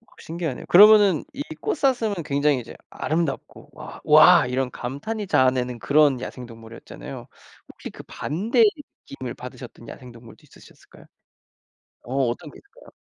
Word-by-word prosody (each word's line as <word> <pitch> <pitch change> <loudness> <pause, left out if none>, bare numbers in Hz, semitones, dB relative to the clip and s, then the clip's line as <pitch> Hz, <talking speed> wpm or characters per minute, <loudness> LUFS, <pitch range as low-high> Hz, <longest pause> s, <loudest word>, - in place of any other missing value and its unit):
우와. 230 - -28
신기하네요. 165 -5 -6
그러면은 205 -2 +6
이 280 +1 -5 0.2
꽃사슴은 260 - 0
굉장히 145 -2 0
이제 115 - -11 0.2
아름답고 155 -3 -4
와, - - -11
와 - - +6
이런 125 0 -2
감탄이 195 - -6
자아내는 130 -4 +1
그런 145 -3 +2
야생동물이었잖아요. 115 - -10 0.5
혹시 - - -10
그 - - -12
반대의 220 - 0 0.4
느낌을 130 -3 -8
받으셨던 125 -2 -11
야생동물도 120 -3 -13
있으셨을까요? - - -19 1.0
어. 130 +2 -7
어떤 145 +5 -7
게 - - -15
있을까요? 470 +5 -20
140 Hz, 365 characters per minute, -23 LUFS, 125-200 Hz, 1.0 s, 그러면은